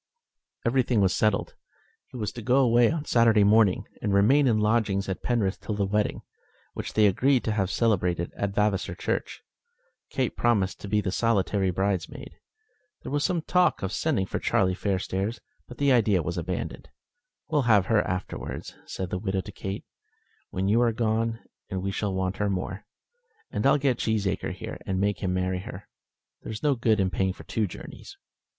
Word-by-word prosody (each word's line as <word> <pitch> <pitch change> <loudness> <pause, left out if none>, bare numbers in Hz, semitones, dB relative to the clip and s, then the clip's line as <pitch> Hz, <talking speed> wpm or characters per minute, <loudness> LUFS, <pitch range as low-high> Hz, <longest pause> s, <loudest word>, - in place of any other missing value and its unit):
Everything 125 -1 +2
was 95 -1 +3
settled. 105 -2 +1 0.5
He - - -10
was 105 -4 -2
to 120 - -8
go 125 +3 +2
away 120 -2 +5
on 160 -2 -3
Saturday 115 -3 +4
morning, 105 -2 +4 0.2
and 105 - -1
remain 130 +8 +5
in 115 -3 +3
lodgings 105 -2 +1
at 95 - -4
Penrith 110 -6 0
till 105 - -3
the 100 -1 0
wedding, 105 +2 -1 0.5
which - - -6
they 110 - +4
agreed 125 +6 +3
to 110 - -1
have 100 -4 0
celebrated 90 -7 0
at 100 -1 -3
Vavasor 105 -2 0
Church. - - -3 0.7
Kate 130 -2 -1
promised 100 -6 +1
to - - -6
be 105 +1 +1
the 95 - -2
solitary 100 -3 +1
bridesmaid. 95 0 -2 0.7
There - - -6
was 145 0 0
some 175 -4 0
talk 180 - +2
of 95 - -2
sending 105 -3 0
for - - -3
Charlie 95 -1 +2
Fairstairs, 95 +3 -2 0.3
but 125 - -11
the 140 -1 +3
idea 105 -8 +3
was - - -3
abandoned. - - -4 0.6
"We'll 145 -6 +1
have 105 -4 +5
her 110 0 +3
afterwards," 90 0 -5
said 95 -2 -5
the 90 - -1
widow 95 -1 -1
to 105 - -10
Kate, 95 0 -6 0.6
"when 95 +1 -2
you 110 +4 +3
are 120 -1 +3
gone, 115 0 0 0.3
and 95 -2 -3
we 100 - -1
shall 100 -1 -2
want 95 0 -1
her 105 -1 0
more. 95 +1 -4 0.7
And - - +1
I'll 140 - +5
get 135 -4 +1
Cheesacre 105 -4 -1
here, - - -7
and 95 -1 -1
make 100 -1 0
him 95 - -1
marry 90 0 -1
her. 90 - -9 0.5
There's 110 +3 -7
no 145 -2 +4
good 115 -4 +1
in 95 -1 +1
paying 95 0 0
for - - -13
two 110 -2 -1
journeys." - - -11
105 Hz, 185 wpm, -26 LUFS, 95-115 Hz, 0.7 s, away